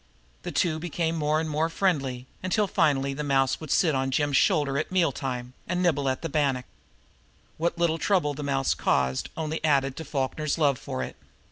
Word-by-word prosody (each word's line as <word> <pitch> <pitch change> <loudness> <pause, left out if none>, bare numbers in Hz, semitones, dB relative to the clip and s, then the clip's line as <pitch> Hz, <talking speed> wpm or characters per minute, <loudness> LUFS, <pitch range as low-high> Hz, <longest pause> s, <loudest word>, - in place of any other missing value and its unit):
The - - -5
two 160 -4 +1
became 165 0 -1
more 155 0 +1
and 160 - -2
more 155 +2 0
friendly, 140 -9 0 0.2
until 185 +3 +1
finally 140 -7 +1
the 150 +2 -4
mouse 135 -2 +2
would 155 - -8
sit 165 -1 +3
on 135 0 0
Jim's 145 +1 +1
shoulder 140 0 +3
at 155 - -3
meal 180 -5 +3
time, 125 -2 -4
and 180 +1 0
nibble 145 -6 +2
at 130 - -2
bannock. 135 -4 +1 0.9
What 170 +1 0
little 165 -1 +1
trouble 175 -5 +2
the 145 - -6
mouse 135 -2 +1
caused 65 0 0
only 160 0 -3
added 140 -3 +2
to 160 - -5
Falkner's 145 +1 -2
love 145 -5 +2
for 65 - -4
it. - - -7
150 Hz, 190 wpm, -26 LUFS, 135-165 Hz, 0.9 s, sit